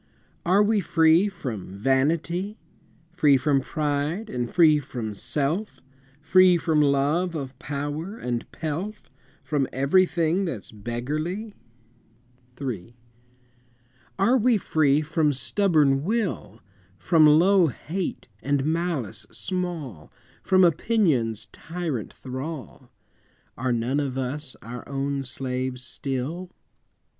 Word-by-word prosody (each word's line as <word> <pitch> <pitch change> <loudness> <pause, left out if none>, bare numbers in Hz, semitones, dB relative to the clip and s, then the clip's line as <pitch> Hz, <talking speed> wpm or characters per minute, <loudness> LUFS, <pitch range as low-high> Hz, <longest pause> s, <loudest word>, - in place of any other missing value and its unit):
Are 195 +4 +5
we 215 0 +2
free 165 +1 +4
from 115 - -6
vanity, 165 - 0 0.5
Free 150 -5 +4
from 135 +1 +2
pride, 150 +8 -2
and 120 -1 -2
free 155 -4 +5
from 120 -6 -5
self, 145 - -2 0.4
Free 180 +4 +5
from 160 -2 +2
love 150 +5 +2
of 135 -3 -6
power 145 +8 -4
and 120 - -4
pelf, 170 +7 -5 0.3
From 145 -4 0
everything 170 +5 +2
that's 130 - -5
beggarly? 150 - -4 1.1
III. 120 -5 -5 1.2
Are 235 +7 +4
we 235 0 +4
free 150 -6 +2
from 155 -1 +1
stubborn 140 +1 +2
will, 185 - -2 0.4
From 160 - +5
low 175 +4 +5
hate 170 +6 -4
and 140 +2 0
malice 155 - -2
small, 165 - -4 0.3
From 185 0 +4
opinion's 155 - +2
tyrant 160 - -4
thrall? 130 -1 -7 0.7
Are 130 +1 -1
none 120 +4 0
of 135 -3 -2
us 135 +2 -4
our 120 +1 -7
own 140 0 -2
slaves 130 -1 -4
still? 140 +8 -4
150 Hz, 105 wpm, -25 LUFS, 130-175 Hz, 1.2 s, Are